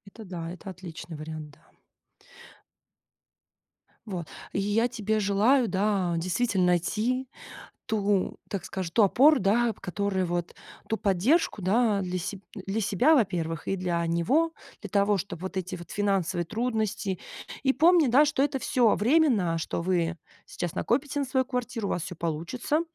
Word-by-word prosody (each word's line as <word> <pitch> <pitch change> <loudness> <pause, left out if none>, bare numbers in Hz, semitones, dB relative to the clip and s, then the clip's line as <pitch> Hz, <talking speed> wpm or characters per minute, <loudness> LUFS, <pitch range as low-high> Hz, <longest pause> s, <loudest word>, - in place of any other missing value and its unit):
Это 220 - -9
да, 170 -3 -6
это 180 +2 -8
отличный 175 -3 -9
вариант, 155 0 -7
да. 140 - -24 2.3
Вот, 180 -6 -5 0.3
и - - 0
я 210 +4 +2
тебе 220 -2 -1
желаю, 215 +6 +3
да, 195 -3 +1
действительно 185 +3 +1
найти 220 +9 0 0.6
ту, 205 -3 0
так 200 - -4
скажу, 185 -3 -4
ту 225 - +4
опору, 270 +9 +5
да, 225 +4 +2
которая 190 0 -1
вот 175 0 -3 0.3
Ту 220 - 0
поддержку, 215 - +2
да? 210 +2 +2
Для 185 0 -2
себ 190 +2 -5
для 195 +1 -3
себя, 215 - +3
во-первых, 175 - 0
и 195 - 0
для 175 -2 -1
него, 255 - +2 0.3
для 205 - -7
того, 200 +1 +3
чтобы 180 -2 -5
вот 190 0 -5
эти 185 -1 -3
вот 175 -1 -11
финансовые 190 -4 0
трудности 220 -2 -2 0.4
И 265 - +3
помни, 335 +1 +5
да, 270 +6 +6
что 285 -2 +1
это 280 -1 0
всё 245 -3 +3
временно, 230 - +3
что 165 - -3
вы 170 -2 0 0.3
сейчас 175 -2 -4
накопите 285 +4 0
на 280 - 0
свою 260 0 +1
квартиру, 245 -4 -3
у - - -3
вас 175 - -1
всё 180 +2 -6
получится. 170 - -1
200 Hz, 155 wpm, -27 LUFS, 180-240 Hz, 2.3 s, да